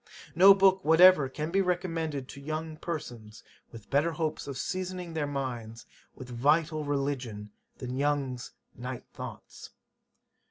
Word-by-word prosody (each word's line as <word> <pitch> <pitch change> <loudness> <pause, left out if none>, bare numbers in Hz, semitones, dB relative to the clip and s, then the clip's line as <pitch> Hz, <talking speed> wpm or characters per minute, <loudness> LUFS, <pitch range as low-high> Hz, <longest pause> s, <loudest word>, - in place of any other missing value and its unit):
No 195 +4 +8
book 190 -1 +4
whatever 160 -3 +6
can 150 +4 -4
be 195 +2 +3
recommended 165 -6 -2
to 140 - -10
young 155 +2 -4
persons, 120 -11 -7 0.3
with 115 -3 -13
better 150 +4 +2
hopes 155 -2 -3
of 140 -2 -5
seasoning 185 +1 -4
their 155 -2 -1
minds 120 -5 -5 0.3
with 130 - -10
vital 150 +5 +1
religion, 135 -7 -3 0.3
than 125 -1 -5
YOUNG'S 140 -4 -1 0.3
Night 125 0 -6
Thoughts. - - -9
145 Hz, 130 wpm, -29 LUFS, 130-165 Hz, 0.3 s, No